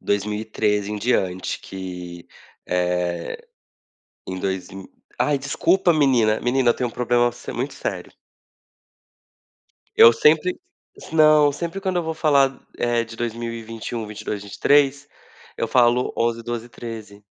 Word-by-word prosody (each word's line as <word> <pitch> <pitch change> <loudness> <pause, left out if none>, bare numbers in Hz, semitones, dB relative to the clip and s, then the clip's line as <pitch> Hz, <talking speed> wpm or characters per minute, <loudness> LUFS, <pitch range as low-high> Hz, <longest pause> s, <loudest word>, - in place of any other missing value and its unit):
2013 105 0 -1
em - - -3
diante 95 -5 -1
que, 90 -2 -8 0.4
eh 90 -1 -1 0.9
Em 95 0 -5
dois 95 -1 -3
mi 95 0 -9 0.3
Ai 150 -1 +2
desculpa 175 +6 +2
menina! 125 -8 +3
Menina 125 0 +2
eu - - +2
tenho 125 - -2
um - - -18
problema 120 0 +1
se 120 - -8
muito 135 +3 -4
sério. 90 -8 -5 1.8
Eu 115 - +9
sempre 155 +9 +3 0.5
Não, 155 -2 +5
sempre 170 +5 -5
quando 190 -2 -2
eu 175 - +1
vou 160 0 -3
falar, 140 -4 +2 0.2
eh, 120 -1 +1
de 115 0 -11
2021, 115 -1 -5
22, 105 -1 -5
23. 140 +6 +2 0.5
Eu 115 - -2
falo: 120 +1 +3
"11, 115 0 0
12, 120 0 -5
13" 110 -4 -9
115 Hz, 130 wpm, -22 LUFS, 105-135 Hz, 1.8 s, Eu